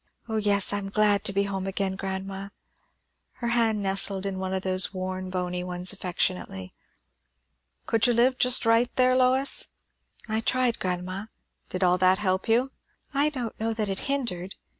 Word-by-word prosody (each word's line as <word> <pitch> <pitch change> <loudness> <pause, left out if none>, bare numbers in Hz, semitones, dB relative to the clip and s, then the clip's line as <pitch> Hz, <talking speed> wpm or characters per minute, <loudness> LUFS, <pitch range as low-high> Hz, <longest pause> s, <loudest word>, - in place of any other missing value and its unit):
O 220 -1 -2
yes! 205 -2 +2
I 205 - 0
am 195 -1 -6
glad 205 -1 +2
to - - +1
be 200 +1 +1
home, 195 -1 -3
grandma." 195 0 -4 0.8
Her 235 - -4
hand 225 -3 +1
nestled 195 0 +2
in 195 -1 -3
one 190 0 -3
of 190 0 -2
those 185 0 +2
worn, 185 -1 -4
bony 180 -1 -3
ones 180 +1 0
affectionately. 180 - -2 1.1
"Could 225 +1 +2
you 245 - +3
live 255 +2 +2
just 250 -1 +5
right 230 +2 +4
there, 255 0 +4
Lois?" 260 +2 +2 0.5
"I 220 0 -1
tried, 250 0 +1
grandma." 185 +3 -3 0.4
"Did 185 +1 -2
all 180 0 +3
that 185 +1 +4
help 190 -2 -1
you?" 245 +4 +2 0.4
"I 285 +2 +2
don't 250 -6 -5
know 225 0 -1
that 215 -2 -1
it 195 - -2
hindered. 195 -10 -2
195 Hz, 165 wpm, -26 LUFS, 185-230 Hz, 1.1 s, just